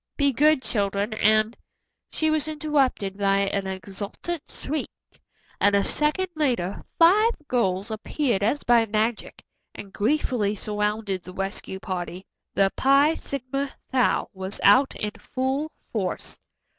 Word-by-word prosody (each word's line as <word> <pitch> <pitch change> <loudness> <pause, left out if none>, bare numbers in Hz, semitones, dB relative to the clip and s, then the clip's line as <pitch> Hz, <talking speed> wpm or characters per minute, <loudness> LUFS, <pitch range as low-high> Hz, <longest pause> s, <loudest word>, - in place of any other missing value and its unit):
Be 280 -2 +2
good 300 +1 +4
children, 200 0 -1
and 215 +1 +3 0.3
" - - -53
She 315 0 +1
was 310 -1 0
interrupted 280 -10 0
by 195 0 +3
an 195 0 -1
exultant 200 - -5
shriek, 300 +2 -4 0.7
and 200 0 +4
a 200 - +3
second 300 +5 +1
later 240 - -1
five 415 +8 +5
girls 200 -3 0
appeared 220 0 -1
as 230 +8 0
by 235 -1 +4
magic 220 +2 -2 0.3
and 200 -1 -9
gleefully 225 -3 +1
surrounded 210 -1 -2
the 180 +1 -11
rescue 195 0 -4
party. 185 -1 -5 0.3
The 195 -1 +3
Phi 280 +3 +5
Sigma 275 -2 -4 0.2
Tau 255 -2 +2
was 190 +1 -5
out 255 +7 +5
in 210 - -2
full 265 +4 -2 0.2
force. 195 -5 -3
220 Hz, 130 wpm, -25 LUFS, 200-280 Hz, 0.7 s, five